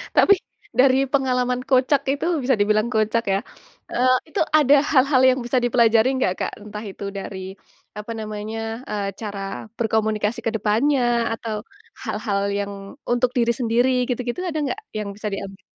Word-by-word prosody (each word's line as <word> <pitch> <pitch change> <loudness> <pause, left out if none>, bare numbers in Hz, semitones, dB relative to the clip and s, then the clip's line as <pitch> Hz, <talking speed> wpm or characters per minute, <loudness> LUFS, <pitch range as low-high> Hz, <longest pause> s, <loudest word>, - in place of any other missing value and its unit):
Tapi 400 - +7 0.5
dari 260 0 +6 0.2
pengalaman 250 -2 +1
kocak 265 +1 +3
itu 285 - -3 0.2
bisa 260 0 +3
dibilang 215 +2 +2
kocak, 220 +2 +1
ya, - - +3 0.6
eee, 255 +1 +3 0.2
itu 310 - -3 0.2
ada 290 -1 +6 0.2
hal-hal 265 -1 +4
yang 260 0 +2
bisa 250 +2 0
dipelajari 235 -1 +4
nggak, 185 - +1
Kak? - - -1
Entah 210 +1 -7
itu 200 - -10
dari 195 0 -6 0.6
apa 215 +2 -6
namanya, 215 0 -5 0.3
eee, 205 -2 -2
cara 205 -2 -5 0.4
berkomunikasi 220 -1 0
ke 225 - +1
depannya 230 +7 +2 0.3
atau 225 -1 -4 0.5
hal-hal 200 -3 -1 0.2
yang 200 0 -3 0.4
untuk 245 +1 +2
diri 235 -1 +3
sendiri, 240 +2 +2 0.2
gitu-gitu, 245 +3 -2
ada 315 - -3
nggak 370 +9 -3 0.2
yang 210 -1 -3
bisa 210 +1 -5
diambil? 195 0 -6
230 Hz, 150 wpm, -22 LUFS, 210-255 Hz, 0.6 s, Tapi